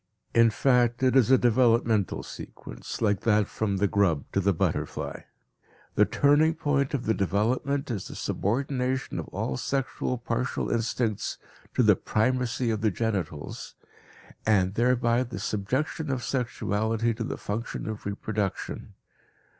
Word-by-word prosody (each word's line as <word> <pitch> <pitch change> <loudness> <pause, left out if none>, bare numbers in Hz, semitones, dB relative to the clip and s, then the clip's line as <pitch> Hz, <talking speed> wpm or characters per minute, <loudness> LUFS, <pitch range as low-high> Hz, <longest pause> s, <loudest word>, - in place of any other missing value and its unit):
In 115 0 +6
fact, 125 +1 +2
it 130 0 +3
is 130 -3 +5
a 130 - +7
developmental 115 -4 +2
sequence, - - -8
like 105 -3 +2
that 105 -1 +3
from 100 -1 -2
the 100 +2 +2
grub 95 -8 +1
to - - +1
the 100 +1 +3
butterfly. 90 - -2 0.7
The - - +5
turning 150 +3 +3
point 145 -3 0
of 125 - -3
the 110 - +2
development 125 +9 0
is 100 -5 -3
the - - -9
subordination 130 +3 -1
of - - -5
all 65 - -3
sexual 135 -1 -2
partial 120 +1 -2
instincts 115 -2 -1 0.4
to - - +4
the - - +6
primacy 125 +1 0
of 110 -1 -2
the 110 - +3
genitals, 95 -8 -3 0.7
and 95 -3 +3
thereby 120 +1 +2
the 125 -1 -4
subjection 130 +9 -2
of 130 -2 -1
sexuality 115 -2 0
to 115 +1 -4
the - - -4
function 110 +2 -4
of 110 -1 -5
reproduction. 100 -1 -3
115 Hz, 140 wpm, -27 LUFS, 105-130 Hz, 0.7 s, a